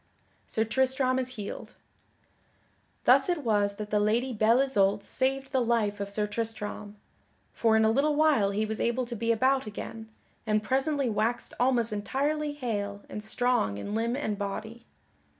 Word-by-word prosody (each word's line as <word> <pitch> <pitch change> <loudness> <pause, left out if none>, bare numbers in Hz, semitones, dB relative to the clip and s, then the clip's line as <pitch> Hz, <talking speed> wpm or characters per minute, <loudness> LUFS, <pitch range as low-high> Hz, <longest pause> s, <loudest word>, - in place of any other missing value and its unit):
[Sidenote: - - -35
Sir 220 - +1
Tristram 260 +1 +2
is 255 -1 -1
healed] 205 -2 -7 1.3
Thus - - +5
it 345 -4 0
was 205 -3 +1
that 210 0 -7
the 210 - +3
Lady 235 +5 +1
Belle 220 +2 +4
Isoult 200 -6 +2
saved 270 +3 -1
the 265 -3 +2
life 225 -4 0
of 200 0 -3
Sir 210 +1 +1
Tristram, 210 -1 -5 0.6
for 225 -1 +3
in 220 - +4
a 220 - +4
little 290 +5 +2
while 290 -10 +3
he 210 +2 -1
was 220 0 -4
able 240 +2 0
to 240 0 -6
be 230 +1 0
about 260 +2 +2
again, 220 +1 -7 0.4
and 215 0 +1
presently 270 +3 +1
waxed 225 +2 -1
almost 240 -3 +2
entirely 290 +8 -1
hale 205 -7 -4
and 210 - -6
strong 220 - 0
in 200 - -5
limb 230 +2 0
and 215 -7 -3
body. 220 +4 -5
225 Hz, 170 wpm, -28 LUFS, 210-260 Hz, 1.3 s, Thus